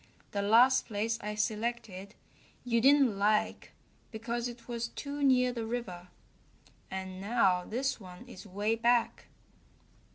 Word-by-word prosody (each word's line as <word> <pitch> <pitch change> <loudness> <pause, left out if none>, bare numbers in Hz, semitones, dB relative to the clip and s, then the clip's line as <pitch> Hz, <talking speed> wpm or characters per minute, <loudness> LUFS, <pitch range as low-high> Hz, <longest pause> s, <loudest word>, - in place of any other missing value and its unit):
The 200 - -1
last 235 +6 +5
place 225 +1 -2
I 210 0 -4
selected 215 -2 -3 0.5
you 235 -1 +1
didn't 270 -5 +4
like 210 +1 0 0.4
because 235 +2 -3
it 240 -1 -10
was 235 -1 -3
too 285 +4 -6
near 250 -2 +3
the 230 -2 -4
river, 190 -7 -5 0.8
and 190 0 -6
now 195 -4 +2
this 260 +4 -2
one 185 +4 -12
is 195 -6 -11
way 205 +3 -1
back." 235 +1 +1
230 Hz, 130 wpm, -31 LUFS, 200-245 Hz, 0.8 s, last